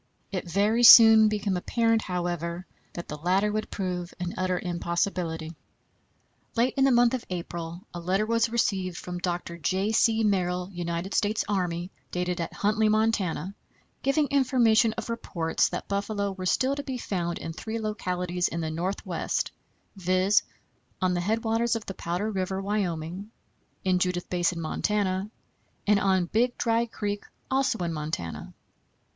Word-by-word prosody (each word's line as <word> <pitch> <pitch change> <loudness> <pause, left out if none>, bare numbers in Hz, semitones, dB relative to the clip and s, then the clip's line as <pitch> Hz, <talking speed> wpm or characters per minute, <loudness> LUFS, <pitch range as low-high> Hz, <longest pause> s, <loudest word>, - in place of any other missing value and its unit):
It 185 -3 -4
very 205 +6 +2
soon 225 -2 +10
became 205 -2 0
apparent, 225 +4 +1
however, 175 -1 -3 0.3
that 170 - -7
the 150 - -6
latter 190 +6 +2
would 215 0 -2
prove 180 -3 -4
an 180 0 -3
utter 185 -1 0
impossibility. 170 -2 -2 1.0
Late 240 +2 +2
in 270 - +4
the 270 - +4
month 240 0 +4
of 255 - -2
April 170 -1 -5
a 175 - -5
letter 185 +5 0
was 230 +1 +2
received 195 -6 0
from 180 0 -6
Dr. 175 -1 -3
J. 190 +6 0
C. 225 0 +3
Merrill, 180 -2 0
United 175 +2 -3
States 210 +1 +1
Army, 180 -3 -1 0.2
dated 180 -1 -2
at 165 - -3
Huntley, 215 +1 +1
Montana, 210 -5 0 0.5
giving 290 +2 +2
information 240 -5 +3
of - - -5
reports 170 -8 0
that - - -5
buffalo 200 0 -1
were 185 -1 -4
still 260 +8 +2
to 285 - -3
be 265 -3 -4
found 175 -7 -2
in 165 - -6
three 220 +6 -5
localities 180 -5 -2
in 170 - -3
the 160 -1 -2
Northwest, 180 +5 -2 0.4
viz: 185 +2 +3 0.6
on 185 -1 +1
the 175 - 0
headwaters 225 +4 +1
of 225 - -4
the 195 - -5
Powder 180 +5 -2
River, 190 -1 -2
Wyoming; 190 -2 -3 0.5
in 185 -1 +2
Judith 180 -1 -1
Basin, 175 -1 0
Montana; 195 +3 -1 0.6
and 205 -1 +4
on 190 -3 +2
Big 240 +7 +1
Dry 230 0 +1
Creek, 205 -2 -4 0.3
also 265 -3 +2
in 170 -1 -2
Montana. 150 - -5
190 Hz, 150 wpm, -27 LUFS, 175-220 Hz, 1.0 s, soon